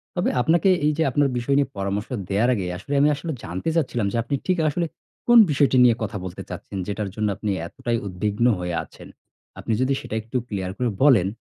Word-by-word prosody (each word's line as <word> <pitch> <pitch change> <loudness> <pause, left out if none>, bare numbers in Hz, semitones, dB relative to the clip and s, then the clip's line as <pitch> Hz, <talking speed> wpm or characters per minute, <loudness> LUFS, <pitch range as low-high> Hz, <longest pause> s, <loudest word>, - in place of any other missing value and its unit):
তবে 175 - +1
আপনাকে, 170 +8 +3 0.2
এই 150 - +4
যে 165 - +2
আপনার 145 -2 +2
বিষয় 120 +3 0
নিয়ে 140 -2 +2
পরামর্শ 100 +2 -2 0.2
দেয়ার 105 +5 +2
আগে, 100 -4 -3
আসলে 100 +10 -6
আমি 145 - +5
আসলে 160 +3 -5
জানতে 90 - -3
চাচ্ছিলাম 125 -9 0
যে, - - -2
আপনি 140 - -2
ঠিক 185 -1 +2
আসলে 170 +4 -1 0.4
কোন 240 0 +7
বিষয়টি 140 -2 +3
নিয়ে 120 -2 +5
কথা 105 -1 -3
বলতে 90 - -7
চাচ্ছেন? 100 - -7
যেটার 105 0 -3
জন্য 110 -1 0
আপনি 105 - -2 0.2
এতটাই 120 +6 -2
উদ্বিগ্ন 105 +4 -1
হয়ে 90 -1 -3
আছেন। - - -14 0.5
আপনি 115 - -2
যদি 130 +1 +2
সেটা - - -6
একটু 115 +4 -4
ক্লিয়ার 95 -5 -3
করে 125 -1 0
বলেন, 120 -11 +5
120 Hz, 205 wpm, -23 LUFS, 100-145 Hz, 0.5 s, কোন